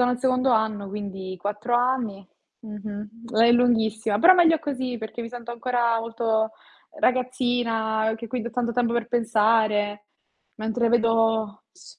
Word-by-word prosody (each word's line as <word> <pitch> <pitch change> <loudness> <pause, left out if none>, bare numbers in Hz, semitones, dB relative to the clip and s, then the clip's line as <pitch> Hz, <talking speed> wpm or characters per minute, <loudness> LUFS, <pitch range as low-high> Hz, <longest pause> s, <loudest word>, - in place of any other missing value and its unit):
sono 245 - +4
al 245 - -1
secondo 255 0 +1
anno, 215 -3 0
quindi 195 -2 -6
4 210 +5 -2
anni. 240 -6 -1 0.4
Mh-mh. 215 +2 -8
È 230 +1 +6
lunghissima, 220 -3 +2
però 365 - +7
meglio 330 -3 +5
così 260 -5 -4
perché 220 +1 -7
mi 230 - -6
sento 240 0 -9
ancora 235 -1 0
molto 225 -1 -1 0.5
ragazzina, 240 -3 0
uhm, 220 - -3
che 230 +1 -8
quindi 235 0 -3
ho - - -12
tanto 235 0 -2
tempo 235 -1 0
per 235 -1 -2
pensare, 215 -3 +1 0.5
mentre 225 +2 -1
vedo 225 -2 +1
s 370 +7 -17
230 Hz, 150 wpm, -24 LUFS, 220-245 Hz, 0.5 s, però